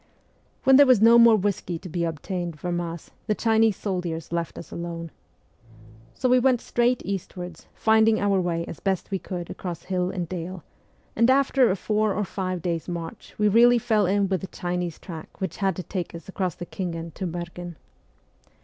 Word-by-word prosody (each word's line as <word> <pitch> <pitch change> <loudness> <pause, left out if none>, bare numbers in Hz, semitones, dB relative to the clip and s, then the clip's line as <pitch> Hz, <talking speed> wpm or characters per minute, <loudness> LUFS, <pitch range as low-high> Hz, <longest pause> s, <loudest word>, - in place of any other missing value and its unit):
When 265 -1 +7
there 285 -1 +8
was 255 -4 +6
no 230 +2 +7
more 235 -1 +8
whisky 190 -4 -1
to 185 - -10
be 170 0 -1
obtained 170 +1 -4
from 175 +1 -2
us 170 -1 -7 0.2
the 210 - +1
Chinese 225 -2 +3
soldiers 180 -5 -3
left 170 -1 -3
us - - -9
alone. 170 -1 -5 1.0
So 255 - 0
we 250 0 +5
went 250 -1 +3
straight 240 +1 +1
eastwards, 180 -3 -6
finding 220 0 +4
our 200 -2 +2
way 170 -1 -1
as 165 - -8
best 195 0 -2
we 195 - -1
could 175 -2 -6
across 175 -3 -6
hill 180 -1 -1
and 180 -3 -3
dale, 180 0 -6 0.5
and 230 +2 +4
after 265 -1 +4
a 190 - +2
four 210 +1 0
or 210 - 0
five 185 -2 -3
days' 170 -2 -2
inarch 170 -2 -7
we 210 - +3
really 240 +4 +6
fell 220 -4 +2
in 200 +1 +2
with 190 -2 -1
the 190 - -5
Chinese 175 -3 -3
track 165 -4 -10
which 190 -4 -3
had 195 -3 0
to 185 - -5
take 180 -3 -5
us 170 - -10
across 185 -3 -2
the 175 - -7
Khingan 170 -3 -5
to 190 - -4
Merghen. 175 0 -6
185 Hz, 190 wpm, -25 LUFS, 170-215 Hz, 1.0 s, there